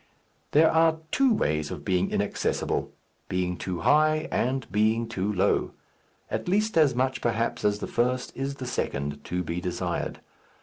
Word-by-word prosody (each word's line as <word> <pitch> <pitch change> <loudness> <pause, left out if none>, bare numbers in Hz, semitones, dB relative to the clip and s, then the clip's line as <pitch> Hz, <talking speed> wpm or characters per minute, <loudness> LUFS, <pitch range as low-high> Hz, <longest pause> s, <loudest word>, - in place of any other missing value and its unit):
There 160 +2 +6
are 160 0 +4
two 270 -1 +3
ways 75 - 0
of - - -7
being 90 -1 +1
inaccessible: - - -1 0.4
being 90 -1 -1
too 90 0 -4
high 155 +1 +3
and 130 +2 0
being 110 +2 +2
too 100 +1 -2
low. 95 -2 +1 0.6
At - - -3
least 210 +4 +1
as 150 -6 +4
much, 130 +1 0
perhaps, 115 0 -1
as 105 0 +2
the - - -4
first 125 +1 -1
is 135 +1 -3
the 130 - -6
second 70 - -3
to 90 +1 -2
be 85 +1 -3
desired. 90 -1 -3
120 Hz, 160 wpm, -27 LUFS, 90-150 Hz, 0.6 s, There